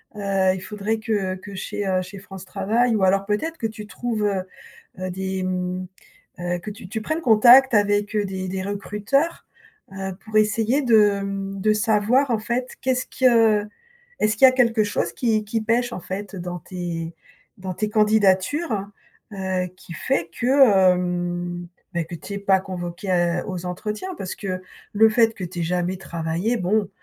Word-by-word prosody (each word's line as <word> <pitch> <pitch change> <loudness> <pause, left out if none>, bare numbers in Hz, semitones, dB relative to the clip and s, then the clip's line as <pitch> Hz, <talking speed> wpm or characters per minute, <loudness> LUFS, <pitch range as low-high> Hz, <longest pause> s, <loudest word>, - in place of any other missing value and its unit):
Heu, 195 -2 +1
il 185 - -7
faudrait 210 +3 -3
que 205 -4 -1
que 195 +1 -10
chez, 200 +2 -4
heu, 185 -1 +1
chez 190 +2 -9
France 190 -1 -10
Travail, 220 +5 +1
ou 195 - +1
alors 195 +1 +3
peut-être 315 +11 -2
que 225 - -1
tu 215 -1 -9
trouve, 225 -2 -3
heu 195 -3 0 0.6
heu, 185 0 -3
des, 190 +1 -3
mmh, 185 0 -2 0.5
heu, 175 0 -2
que 210 +4 -7
tu 210 -2 -11
tu 220 +3 -4
prennes 315 +9 -2
contact 245 +2 +7
avec, 205 0 +2
heu, 210 - +2
des 190 -1 -4
des 190 +1 -3
recruteurs, 210 - -1 0.5
heu, 190 0 -4
pour 215 -1 -1
essayer 225 +6 +2
de, 210 -4 +4
mmh, 195 0 -4
de 215 +1 +3
savoir, 225 +5 +2
en 225 - +1
fait, 245 +3 -3
qu'est-ce 255 -1 0
que 225 -5 +3 0.5
est-ce 215 +1 +1
qu'il 265 - +7
y 260 - +10
a - - -2
quelque 230 -4 +3
chose 205 - -1
qui 220 -3 +1
qui 220 +1 -2
pêche, 240 +2 +1
en - - -4
fait, 200 +3 -6
dans 175 -1 -5
tes 170 -1 -5 0.4
dans 185 0 -5
tes 210 +4 -2
candidatures? 210 - +2 0.5
Heu, 190 -1 -2
qui - - -14
fait 170 +1 -1
que, 230 -8 +5
mmh, 175 -1 -3 0.3
beh, 170 -2 -1
que 170 - -7
tu 200 +5 -8
es 200 - -3
pas 195 -1 +3
convoqué 175 -1 -1
aux 180 -2 -5
entretiens, 210 - -4
parce 185 -6 -5
que 185 -2 -4 0.3
le 220 +2 +6
fait 225 0 +3
que 185 - -7
tu 175 0 -6
es - - 0
jamais 180 +2 -1
travaillé, 170 +6 -2
bon, 200 +2 0
200 Hz, 180 wpm, -23 LUFS, 185-220 Hz, 0.6 s, y